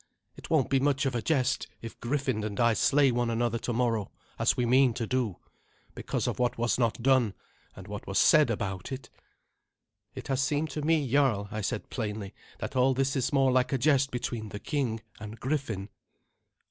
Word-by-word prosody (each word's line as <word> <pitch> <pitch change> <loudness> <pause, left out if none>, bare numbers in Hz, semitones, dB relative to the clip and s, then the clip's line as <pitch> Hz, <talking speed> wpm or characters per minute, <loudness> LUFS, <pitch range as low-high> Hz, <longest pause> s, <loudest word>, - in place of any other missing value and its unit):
It - - -11
won't 150 -6 +2
be 135 - +4
much 140 0 +1
of 135 - 0
a 120 - -1
jest 130 -2 0
if 115 - -9
Griffin 130 -3 -1
and 105 -2 -4
I 115 -1 +4
slay 135 +5 +3
one 120 0 0
another 115 0 0
tomorrow, 115 -4 -1 0.3
as - - +2
we 125 - +1
mean 125 0 +4
to 120 - -2
do, 115 -6 -1 0.6
because - - -3
of - - -2
what 125 -1 +1
was 120 +1 0
not 115 -1 0
done, 130 -6 +3 0.4
and - - -11
what - - -7
was - - -1
said - - +6
about 95 +1 -3
it." 130 0 -7 1.0
"It - - -7
has 135 -1 0
seemed 150 +1 0
to 150 - -4
me, 155 -2 +2
jarl," 120 -6 +2
I 110 - -3
said 100 - -3
plainly, 105 -4 -4 0.2
"that - - -6
all 130 +1 +3
this 135 +1 0
is 130 -3 0
more 135 -2 +3
like 125 0 +2
a 135 - +2
jest 135 0 +3
between 120 -3 -4
the 105 - -7
king 120 -4 -2 0.2
and 105 +1 -8
Griffin." 130 -8 -2
125 Hz, 195 wpm, -28 LUFS, 115-135 Hz, 1.0 s, said